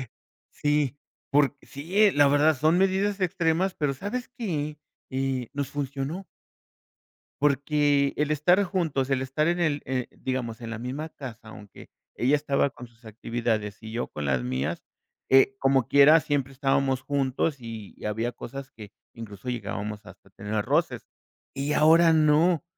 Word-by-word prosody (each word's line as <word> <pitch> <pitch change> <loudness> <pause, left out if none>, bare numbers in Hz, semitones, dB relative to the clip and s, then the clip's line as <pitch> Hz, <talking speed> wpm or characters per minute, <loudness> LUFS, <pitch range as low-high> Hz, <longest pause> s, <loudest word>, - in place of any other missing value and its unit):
Eh 130 - -6 0.5
sí, 145 -2 0 0.3
por 145 0 +3
sí, 190 +9 +2
la 145 -1 +5
verdad 145 +1 +4
son 155 +5 +3
medidas 195 +1 +1
extremas, 175 +1 +1
pero, 145 -3 0
¿sabes 220 - -5
qué?, 155 -9 -3 0.3
eh, 130 -2 -2
nos 140 -1 -3
funcionó. 145 +6 -4 1.2
Porque 145 0 +2
el 150 +1 0
estar 175 +7 +3
juntos, 160 -8 -1
el 130 -1 +1
estar 135 +4 -1
en 175 +1 +1
el 150 -4 +1
eh, 130 -1 -2
digamos, 125 -3 -4
en 115 -1 -6
la 110 - -5
misma 130 +7 -5
casa, 120 -8 -10
aunque 105 -3 -13 0.3
ella 130 +4 +2
estaba 140 -1 +1
con 120 -1 -11
sus 115 0 -28
actividades 110 -1 -3
y 110 0 -9
yo 120 - -3
con 75 - -6
las 65 -3 0
mías, 65 +2 -3 0.5
eh, 135 0 +5
como 135 -2 +3
quieras, 150 +3 +6
siempre 140 -2 -1
estábamos 135 -1 0
juntos 140 +2 -1
y 115 -4 -9
había 110 +3 -2
cosas 135 +1 -9
que, 105 -3 -11 0.2
incluso 115 +1 -9
llegábamos 105 -2 -5
hasta - - -16
tener 105 0 -3
roces. - - 0 0.5
Y 140 +2 -1
ahora 165 +2 +6
no. 155 +2 +3
140 Hz, 155 wpm, -26 LUFS, 120-155 Hz, 1.2 s, quieras